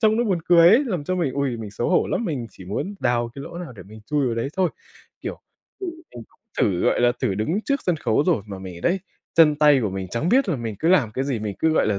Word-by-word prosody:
trông 220 -1 +4
nó 240 - +2
buồn 195 -6 +1
cười 170 0 +6
ấy." 235 +10 +5
Làm 180 - -3
cho 185 - -1
mình, 170 -7 0
ui, 140 -3 -1
mình 110 -3 -7
xấu 110 +4 -2
hổ 180 - +3
lắm, 235 - -1
mình 140 - -3
chỉ 95 - -13
muốn 110 - -4
đào 120 -1 +1
cái 140 - -7
lỗ 170 - -8
nào 175 -7 -7
để 105 - -11
mình 105 +4 -13
chui 145 -2 +1
vào 120 - 0
đấy 115 +3 -2
thôi. 185 -3 +2 0.5
Kiểu, - - -6 0.4
thì 385 - -3
mình 325 - -9
cũng - - -32 0.2
thử, 90 -3 +2
gọi - - +2
là, 120 0 +4
thử 95 - +1
đứng 110 - -1
trước 280 -1 0
sân 180 -3 +2
khấu 120 -2 +1
rồi 160 - +2
mà 100 -2 -7
mình 90 -2 -8
đấy, 185 +2 +1 0.3
chân 160 -2 +6
tay 150 -2 +5
của 105 - -1
mình 95 0 -4
chẳng 120 - -1
biết 255 +3 +3
là 170 - +1
mình 115 -3 -4
cứ 160 - +1
làm 150 -12 +4
cái 130 +4 -2
gì, 135 -4 -1
mình 105 -2 -4
cứ, 160 - +2
gọi - - +2
là, 100 -2 0
140 Hz, 290 wpm, -23 LUFS, 110-180 Hz, 0.5 s, cười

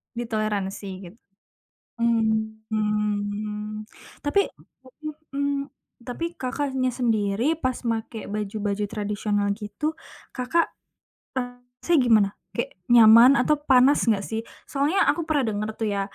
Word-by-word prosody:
Ditoleransi, 215 -4 -2 0.2
gitu? 225 - -23 0.8
Mmm, 220 -1 0
mhm. 210 0 -2 0.4
Tapi, 395 +8 +2 0.9
mhm. 280 0 -1 0.4
Tapi 335 +7 -4
Kakaknya 265 0 -1
sendiri 230 +3 +1
pas 255 -5 0
make 225 -1 -3
baju-baju 210 0 -2
tradisional 205 -1 -1
gitu, 220 +10 -4 0.4
Kakak 260 +7 +1 0.7
ngerasanya 245 +5 -1
gimana? 215 -4 +5 0.3
Kayak 235 - -2 0.2
nyaman 230 +2 +9
atau 300 +4 +3
panas 265 +2 +5
enggak 205 -3 +3
sih? 220 - -1 0.3
Soalnya 295 +8 +2
aku 340 - -1
pernah 290 -4 +2
denger 210 +1 -2
tuh 220 - 0
ya, 200 - 0
225 Hz, 110 wpm, -25 LUFS, 210-260 Hz, 0.9 s, nyaman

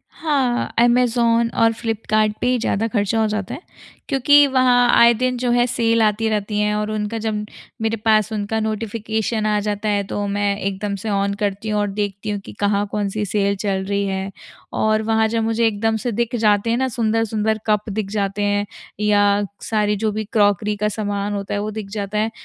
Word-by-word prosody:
हाँ, 270 -6 0
ऐमज़ॉन 235 -1 +3
और 225 0 +4
फ्लिपकार्ट 215 -1 0
पे - - +1
ही 250 0 +2
ज़्यादा 225 -1 0
ख़र्चा 215 -1 0
हो 220 - +2
जाता 210 -2 -3
है। - - -7 0.5
क्योंकि 285 +1 +5
वहाँ 255 -2 +4
आए 235 0 +7
दिन 250 +2 -1
जो 245 0 -1
है 240 0 +3
सेल 230 -1 +1
आती 215 +1 +2
रहती 210 -1 -1
है 210 0 +1
और 210 0 -2
उनका 215 +1 -2
जब 215 -1 -2 0.4
मेरे 225 0 0
पास 215 0 +2
उनका 215 +1 -2
नोटिफिकेशन 220 0 -2
आ 210 -1 +2
जाता 210 +1 -2
है। 205 -1 +1
तो 205 0 -3
मैं 200 0 0
एकदम 200 0 -3
से 220 - -3
ऑन 200 0 0
करती 205 +1 -2
हूँ 210 -1 0
और 205 - 0
देखती 205 +1 -3
हूँ 205 -1 -2
कि - - -9
कहाँ 205 0 +1
कौन-सी 210 0 -2
सेल 200 0 0
चल 195 -1 -2
रही 200 0 -1
है। 190 0 -3 0.4
और 215 0 +2
वहाँ 220 0 +2
जब 225 0 -1
मुझे 225 +1 +1
एकदम 220 +1 0
से 245 - 0
दिख 235 +2 -1
जाते 215 -1 +2
हैं 230 - +2
ना 260 +1 +1
सुंदर-सुंदर 220 -2 0
कप 210 0 +1
दिख 205 -1 -3
जाते 205 -1 -1
हैं 205 0 +1 0.3
या 205 -1 +3 0.3
सारी 210 -1 +1
जो 215 - +2
भी 215 +1 -3
क्रॉकरी 205 -1 +2
का 210 +1 0
सामान 205 -1 -3
होता 200 -1 -4
है 205 - -1
वो 210 +1 -3
दिख 210 -2 -6
जाता 205 0 -3
है, 220 +1 0
215 Hz, 205 wpm, -20 LUFS, 205-225 Hz, 0.5 s, आए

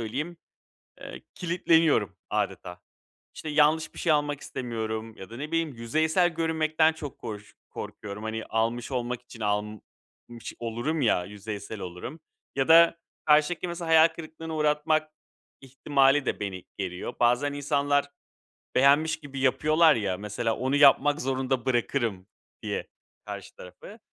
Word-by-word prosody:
söyleyeyim, 150 +10 -4 0.6
eee, - - -9
kilitleniyorum 165 - +2
âdeta. 90 0 -3 0.5
İşte, 155 - -7
yanlış 150 +1 +2
bir - - -11
şey 165 - +2
almak 145 -1 0
istemiyorum 110 -3 -5
ya 95 - -11
da, 115 - -8
ne 145 +5 -5
bileyim, 165 -4 0
yüzeysel 160 +9 +2
görünmekten 160 -1 +2
çok 150 -4 -8
koş 105 -3 -8 0.2
korkuyorum. 105 0 -7
Hani, 110 0 -4
almış 115 +2 -1
olmak 125 -1 -2
için 120 -2 -14
almış 105 0 -1 0.8
olurum 120 +7 -2
ya, 100 -7 +2
yüzeysel 105 +1 -7
olurum. 95 - -7 0.4
Ya 135 +1 +1
da 165 +1 +7 0.3
karşıdakini 155 +4 +3
mesela 170 -1 -5
hayal 160 0 +7
kırıklığına 160 0 -8
uğratmak 155 +1 +1 0.5
ihtimali 135 +1 +2
de - - -2
beni 95 -3 -5
geriyor. 95 +4 -4
Bazen 125 +4 +3
insanlar 145 0 0 0.6
beğenmiş 145 +4 +4
gibi 135 -1 -7
yapıyorlar 155 +4 +4
ya, 100 -4 -1
mesela 105 +3 -2
onu 130 +2 0
yapmak 145 +1 +5
zorunda 130 -1 -1
bırakırım 120 -6 0 0.4
diye - - -4 0.4
karşı - - -8
tarafı, 90 - -12
135 Hz, 130 wpm, -27 LUFS, 110-155 Hz, 0.8 s, da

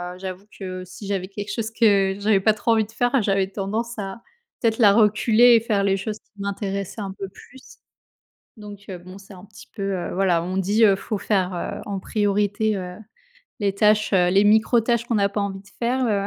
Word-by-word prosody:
heu, - - -14
j'avoue 190 +1 -7
que 185 -2 -6
si 185 +3 -10
j'avais 195 -2 -2
quelque 205 +1 -6
chose 225 -1 -3
que 200 -4 +3
j'avais 205 -1 +3
pas 215 +2 +4
trop 215 +2 -1
envie 220 -1 +2
de 215 - -17
faire, 245 +3 +1
j'avais 195 -2 +1
tendance 215 +4 -4
à 195 +3 -6 0.4
peut-être 225 -2 +1
la 205 -4 +6
reculer 225 +3 +5
et - - +6
faire 215 -3 0
les 195 -1 +2
choses 210 +2 -5
qui - - -43
m'intéressaient 200 0 -4
un 195 -1 -4
peu 195 0 -6
plus. 260 +7 -16 0.8
Donc 205 -1 -11
heu, 185 - -5
bon 185 +2 -12
c'est 200 0 -14
un 180 -1 -13
petit 205 -1 -15
peu, 210 - -6
heu, 175 - -4
voilà 180 -3 +2
on 185 +2 -4
dit, 205 +4 +3
heu, 200 -2 +5
faut 210 +2 -4
faire, 190 -2 0
heu, 175 - -5
en 200 -2 -4
priorité, 205 +1 0
heu, 180 -1 -6 0.7
les 200 -1 0
tâches, 210 +1 +3
heu, 180 -2 +4
les 195 +2 +4
micro 220 +3 +4
tâches 235 +1 0
qu'on 240 - -1
n'a 200 -1 +2
pas 205 - -2
envie 195 -1 -3
de 195 - -19
faire, 250 +2 0
heu. 200 -3 0
200 Hz, 220 wpm, -23 LUFS, 195-220 Hz, 0.8 s, la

